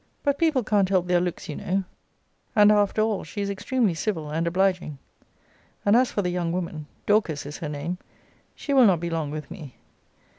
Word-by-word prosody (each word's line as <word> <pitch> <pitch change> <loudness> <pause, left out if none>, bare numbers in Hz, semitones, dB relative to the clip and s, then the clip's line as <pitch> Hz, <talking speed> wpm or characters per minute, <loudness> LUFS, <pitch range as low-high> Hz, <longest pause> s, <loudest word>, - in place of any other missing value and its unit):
But 285 -1 +1
people 310 -7 +2
can't 205 -3 +2
help 185 -2 +2
their 180 -1 +2
looks, 180 -1 -3
you 150 - -5
know; 190 +2 -1 0.7
and 210 -1 +7
after 210 +1 +3
all 215 -3 -1
she 210 - -8
is 200 0 -1
extremely 210 +1 0
civil 160 -3 -3
and 165 +2 -1
obliging, 180 -4 0 0.9
and 205 +2 +5
as 250 +1 +4
for 205 - -1
the 180 - -1
young 175 -2 -1
woman, 170 -4 -4 0.2
(Dorcas 205 -10 +1
is 145 +1 -7
her 155 - -4
name,) 150 +5 -4 0.6
she 280 - -3
will 260 -4 +7
not 180 -4 +3
be 170 0 -4
long 160 -3 -2
with 150 +2 -6
me. 155 -9 -9
185 Hz, 195 wpm, -25 LUFS, 165-210 Hz, 0.9 s, and